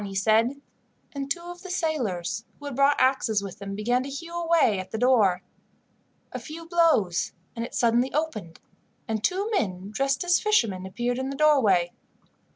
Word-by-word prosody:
he 195 -1 -6
said; 225 +7 +2 0.5
and 280 -1 -5
two 340 - -1
of 350 0 -9
the 375 - -9
sailors, 245 - -2
who 290 - -12
had 285 -3 -5
brought 280 +2 +3
axes 255 -6 +2
with 195 -1 -8
them, 195 0 -6
began 240 +5 +1
to 270 - -6
hew 335 +5 -7
away 330 - +2
at 185 - -7
the 220 - -4
door. 215 -7 +3 0.9
A - - -5
few 330 +1 -9
blows, 325 - +2 0.2
and 230 - -3
it 235 - -7
suddenly 240 +2 +2
opened, 240 - -3 0.5
and 220 -1 -2
two 385 - 0
men 195 - -2
dressed 275 +5 0
as 350 0 +3
fishermen 220 - +1
appeared 240 +5 -2
in 265 +1 -3
the 275 - -4
doorway. 230 - +3
250 Hz, 175 wpm, -26 LUFS, 205-305 Hz, 0.9 s, brought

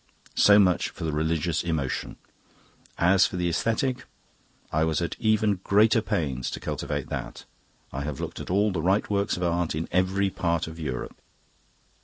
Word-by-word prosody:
"So 100 0 +6
much 90 -4 +3
for - - -9
the 80 - -1
religious 80 +1 0
emotion. 80 -6 -2 0.8
As 95 +3 +4
for - - -8
the 90 -1 0
aesthetic 125 - 0 0.7
I 80 +1 +2
was 80 -1 +1
at 85 -2 -2
even 110 -3 +2
greater 110 +3 +4
pains 70 - -2
to - - -5
cultivate - - -4
that. - - -6 0.5
I 70 - -3
have 70 -1 -4
looked - - -5
at - - -7
all 100 +3 +2
the 90 -4 -2
right 95 +5 +2
works 100 -2 0
of 90 - -3
art 85 -2 0
in 80 +2 -3
every 95 +2 +1
part 85 -2 0
of 80 0 -9
Europe. 70 -6 -5
90 Hz, 170 wpm, -26 LUFS, 80-100 Hz, 0.8 s, So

